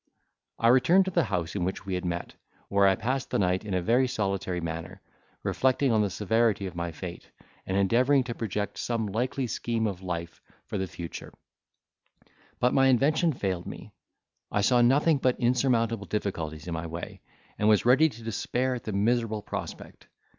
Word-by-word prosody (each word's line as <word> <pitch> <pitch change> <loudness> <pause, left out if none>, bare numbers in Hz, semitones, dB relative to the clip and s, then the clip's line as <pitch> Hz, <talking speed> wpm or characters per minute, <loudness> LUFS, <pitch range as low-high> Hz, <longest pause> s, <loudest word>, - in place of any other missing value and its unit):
I 115 - +3
returned 170 +10 +5
to 190 - -2
the 170 -3 +2
house 90 -3 -2
in 95 - -1
which 95 +2 -3
we 95 - -3
had 90 0 -2
met, 85 -1 -3 0.4
where 100 0 +4
I 95 - +4
passed 130 +6 -2
the - - 0
night 95 0 +1
in 100 -3 -3
a 90 - 0
very 125 +6 +3
solitary 100 -7 -2
manner, 85 +3 -5 0.4
reflecting 130 0 +2
on 110 -1 +3
the 105 - +1
severity 105 +1 +1
of 95 - -5
my 85 0 -3
fate, 85 +2 -8 0.4
and 95 - 0
endeavouring 125 +8 +3
to 120 -1 -4
project 105 -2 -3
some 115 -2 -1
likely 125 +6 -1
scheme 115 -1 -2
of 95 -4 -3
life 85 -2 -5 0.2
for 105 - -4
the 95 - -2
future; 85 -2 -8 1.3
but 125 - +2
my 135 0 +5
invention 150 +6 +3
failed 95 - -3
me; - - -9 0.6
I 105 - +1
saw 120 +4 +4
nothing 140 +5 +4
but 130 -2 +1
insurmountable 120 -4 +1
difficulties 80 -7 -3
in 85 - -3
my 80 +1 -4
way, 85 +1 -7 0.4
and 105 - +3
was 105 -1 +4
ready 140 +6 +5
to 115 -4 -12
despair 125 +3 -1
at 120 - -6
the 110 - -3
miserable 110 +1 +1
prospect! - - -7
110 Hz, 180 wpm, -27 LUFS, 95-125 Hz, 1.3 s, returned